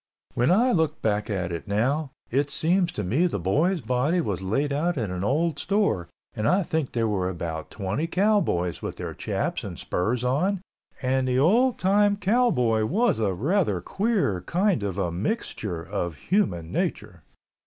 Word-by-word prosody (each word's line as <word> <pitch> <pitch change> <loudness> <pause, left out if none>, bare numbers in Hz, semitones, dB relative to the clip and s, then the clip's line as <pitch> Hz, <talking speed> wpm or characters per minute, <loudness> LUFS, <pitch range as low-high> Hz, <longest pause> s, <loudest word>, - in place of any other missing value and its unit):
When 120 +2 +2
I 235 +8 +4
look 160 -6 0
back 105 -1 0
at 95 -4 -2
it 85 +4 -5
now, 130 +9 0 0.2
it 140 +3 +1
seems 175 +5 +1
to 105 - -3
me 135 - +2
the 165 - -2
boy's 155 - +1
body 130 +8 +1
was 100 - -2
laid 135 +10 0
out 165 +3 0
in 110 -7 -2
an 90 0 -3
old 155 +6 +1
store 195 - +1 0.3
and 105 +1 -1
I 185 +6 +3
think 160 -4 -2
there 115 -2 +1
were 95 -4 0
about 80 -3 -5
twenty 100 - -2
cowboys 180 - +1
with - - -4
their - - -5
chaps - - -2
and - - -6
spurs 115 +7 -1
on 170 +11 +1 0.4
and 130 0 +1
the 125 0 +1
old 225 - +4
time 205 +2 +3
cowboy 190 - +2
was 205 - +1
a 100 -4 0
rather 145 - +1
queer 190 - 0
kind 185 - +1
of 100 -2 -3
a 90 -4 0
mixture 95 - -3
of 85 0 -3
human 90 - 0
nature. - - -3
130 Hz, 175 wpm, -25 LUFS, -, 0.4 s, I